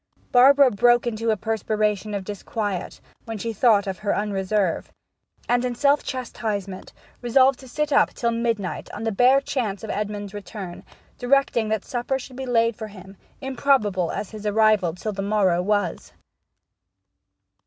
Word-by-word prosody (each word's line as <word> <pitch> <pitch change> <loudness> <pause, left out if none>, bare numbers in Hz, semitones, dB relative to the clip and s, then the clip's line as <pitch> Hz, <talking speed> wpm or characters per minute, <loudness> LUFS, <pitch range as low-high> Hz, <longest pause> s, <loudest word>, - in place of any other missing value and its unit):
Barbara 270 +1 +6
broke 240 +3 +3
into 230 -1 -2
a 215 - +2
perspiration 215 0 -1
of 200 - -3
disquiet 205 -1 -4 0.3
when 225 -2 -5
she 230 +2 -4
thought 215 -2 +3
of 190 -1 -4
her 205 - 0
unreserve, 200 -2 -1 0.6
and, 245 0 +2
in 250 -1 -2
self 285 +3 +3
chastisement, 210 -7 -4 0.3
resolved 260 +2 +3
to 260 - -13
sit 300 +3 -2
up - - +4
till 235 -1 0
midnight 230 -4 -2
on 210 - -6
the 225 - 0
bare 250 +6 +5
chance 225 -8 -3
of 220 - -4
Edmond's 205 -1 -4
return; 200 -3 -8 0.4
directing 245 -3 +2
that 220 -2 -1
supper 255 +1 -2
should 260 0 -10
be 265 0 -6
laid 230 -2 +2
for 220 0 -6
him, 195 -1 -13 0.3
improbable 245 -9 +1
as 205 - -5
his 215 -1 -6
arrival 210 -5 +3
till 210 +4 -4
the 195 - -4
morrow 195 -4 +2
was. 205 -2 -1
215 Hz, 155 wpm, -23 LUFS, 200-245 Hz, 0.6 s, Barbara